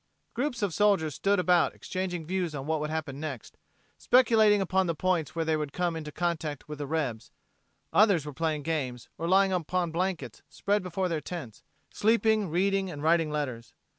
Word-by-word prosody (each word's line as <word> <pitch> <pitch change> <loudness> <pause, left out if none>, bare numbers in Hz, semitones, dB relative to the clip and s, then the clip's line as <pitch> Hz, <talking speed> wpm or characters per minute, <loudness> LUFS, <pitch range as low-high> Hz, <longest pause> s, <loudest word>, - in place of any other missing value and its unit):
Groups 245 -2 -2
of 195 -5 0
soldiers 195 -7 +2
stood 200 +6 +1
about 180 -2 +3
exchanging 180 -3 -4
views 175 -2 -2
on 135 -1 -5
what 160 0 0
would 150 0 -3
happen 155 -3 -4
next, 145 -7 -7 0.4
speculating 225 -4 +5
upon 190 -1 +1
the 170 - -1
points 165 -3 0
where 165 -1 -1
they 160 0 +2
would 150 -2 -3
come 175 -2 -1
into 155 -2 -6
contact 160 -4 -3
with 150 -1 -7
the 145 - -4
rebs: 135 -8 -2 0.6
others 200 -8 +4
were 150 - -6
playing 155 -1 -1
games, 135 -6 -3
or 165 - -2
lying 190 +1 +4
upon 175 0 -1
blankets 170 - -3
spread 205 +1 0
before 185 +1 -2
their 165 -3 -2
tents, 145 -13 -7 0.3
sleeping, 220 -2 +2
reading 195 +3 +1
and 145 -4 -7
writing 165 0 +3
letters. 130 -6 -4
170 Hz, 180 wpm, -28 LUFS, 150-190 Hz, 0.6 s, speculating